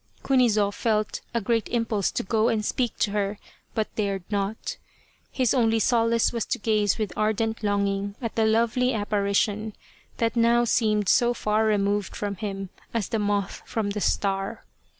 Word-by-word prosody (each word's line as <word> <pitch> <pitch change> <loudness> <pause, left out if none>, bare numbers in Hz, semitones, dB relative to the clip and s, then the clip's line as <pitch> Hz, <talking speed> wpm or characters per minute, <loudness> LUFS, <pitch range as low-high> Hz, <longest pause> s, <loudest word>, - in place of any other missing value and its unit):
Kunizo 225 -6 +3
felt 215 0 -1
a 235 - 0
great 230 +1 0
impulse 225 -4 0
to - - -3
go 220 +3 +1
and 220 -3 0
speak 245 -1 -1
to 205 - +1
her, 205 0 -1 0.4
but 220 -1 -1
dared 200 -3 -1
not. 200 +1 -2 0.5
His 255 -4 +1
only 225 -3 +3
solace 230 +1 +2
was 230 -2 -1
to - - -1
gaze 210 -3 +1
with 210 -5 -3
ardent 220 +1 0
longing 200 -1 0
at 230 -3 -4
the 220 -1 +2
lovely 235 +3 +2
apparition, 205 +1 0 0.4
that 230 0 0
now 235 +1 +4
seemed 215 -3 +2
as 195 - +4
far 215 +1 +1
removed 205 -1 0
from 200 -2 -3
him 195 -1 -4 0.3
as 225 -5 -1
the 225 - 0
moth 205 -1 -1
from 220 -4 -2
the 210 0 -3
star. 195 +3 -1
215 Hz, 165 wpm, -25 LUFS, 205-230 Hz, 0.5 s, now